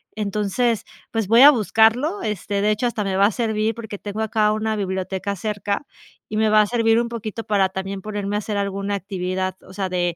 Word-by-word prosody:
Entonces, 210 +2 0 0.3
pues 225 -3 -1
voy 230 +4 +6
a 285 - +11
buscarlo. 240 - +2
Este, 205 -1 -2
de 210 - +2
hecho, 215 +3 0
hasta 225 -3 -2
me 195 -1 -2
va 200 - +5
a 210 - +3
servir 220 -1 0
porque 220 -3 -7
tengo 205 +2 -5
acá 215 -1 +2
una 215 0 -1
biblioteca 190 0 -3
cerca 205 +5 -3 0.4
y 215 - -3
me 220 0 +3
va 215 0 +6
a 210 - +1
servir 230 0 +3
un 235 - -3
poquito 225 -1 -5
para 200 -3 +2
también 190 +1 -5
ponerme 205 0 -3
a - - 0
hacer 210 0 -4
alguna 200 0 -2
actividad, 185 -1 -3
o - - -14
sea, 190 -1 -2
de 175 -1 -1
210 Hz, 215 wpm, -22 LUFS, 195-220 Hz, 0.4 s, a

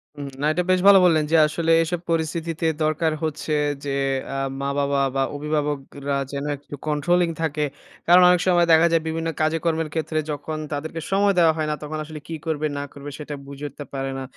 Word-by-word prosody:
উম 145 -1 -6
না - - 0
এটা 180 - 0
বেশ 185 - +3
ভালো 200 -1 +9
বললেন 160 -3 +3
যে - - +4
আসলে 165 +2 -1
এইসব 165 +1 -1
পরিস্থিতিতে 165 0 -2 0.2
দরকার 155 +1 +1
হচ্ছে 155 0 -2 0.3
যে - - -3 0.5
আ - - -2 0.2
মা 140 - -1
বাবা 140 0 +1 0.2
বা 135 - +1
অভিভাবকরা 145 -1 -2 0.2
যেন 140 0 -4
একটু 145 +1 -10
controlling 165 +3 +1
থাকে। 155 -2 -1 0.4
কারণ 175 +2 +7
অনেক 180 -1 +4
সময় 175 -2 +4
দেখা 160 +1 +6
যায় 165 -1 +3
বিভিন্ন 165 +1 -2
কাজেকর্মের 160 0 0
ক্ষেত্রে 160 -1 -1
যখন 150 +2 -4
তাদেরকে 155 +3 -4
সময় 200 +1 +3
দেওয়া 165 -2 +5
হয় 155 -1 -1
না - - 0
তখন 155 +1 -5
আসলে 155 0 -8
কী 165 - -4
করবে? 155 -2 -1
না 140 - -3
করবে? 140 0 -8
সেটা 150 0 -6
বুঝে 140 +1 -7
উঠতে 145 +2 -9
পারে 135 0 -3
না। - - -5
155 Hz, 195 wpm, -23 LUFS, 145-165 Hz, 0.5 s, ভালো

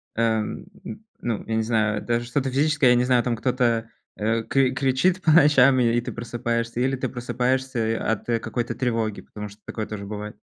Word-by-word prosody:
эм, 110 -1 -1 0.2
н 215 +1 -9 0.2
ну 115 -3 -2
я 110 - -1
не 110 - +1
знаю, 110 -2 0
даже 120 0 -1
что-то 135 +2 -1
физическое, 145 0 +3
я 125 - +6
не 120 - +3
знаю, 125 -1 +3
там 120 -2 0
кто-то, 120 -2 0 0.3
э, 110 +2 0
кри 135 0 +2
кричит 135 +8 +1
по 160 - +3
ночам 140 -4 +6
и 120 0 +2
ты - - -6
просыпаешься, 115 0 -3
или 135 +2 +1
ты 130 - -3
просыпаешься 125 -1 -1
и - - +1
от 110 -1 -2 0.2
какой-то 120 -1 -3
тревоги? 115 -4 -1
Потому 105 0 -8
что 105 +1 -17
такое 110 -2 -4
тоже 100 -2 -7
бывает. 105 +1 -6
120 Hz, 195 wpm, -24 LUFS, 110-130 Hz, 0.3 s, я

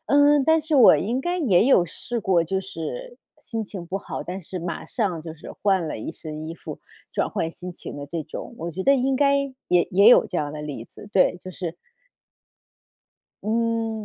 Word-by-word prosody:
嗯， 285 -1 +5
但 320 0 +4
是 310 -1 +1
我 245 - +8
应 240 +6 -1
该 350 +4 -1
也 220 - +4
有 190 -10 +5
试 235 +7 -5
过， 180 -4 +2
就 190 +3 -1
是 485 - -6 0.2
心 225 -2 -4
情 190 -3 -8
不 190 +3 -3
好， - - -6
但 185 +2 -5
是 185 +3 -6
马 170 0 -4
上 190 -8 -1
就 160 -1 -7
是 160 - -10
换 190 -4 +2
了 115 - -4
一 135 - -5
身 155 -1 -7
衣 165 - -5
服， - - -8 0.3
转 - - 0
换 165 - -2
心 180 +1 -8
情 - - -9
的 145 0 -6
这 165 +1 -4
种， 160 - -8
我 170 +1 -4
觉 190 +4 -4
得 275 - +6
应 265 0 +1
该 280 0 +4 0.3
也 175 -1 +3
也 200 +4 +6
有 - - +7
这 - - -4
样 145 -1 -2
的 150 0 -6
例 140 -6 -6
子， 205 - -13
对， 180 -1 +4
就 185 - -8
是 175 -2 -5 1.7
嗯， 225 0 -1
190 Hz, 220 characters per minute, -24 LUFS, 165-240 Hz, 1.7 s, 我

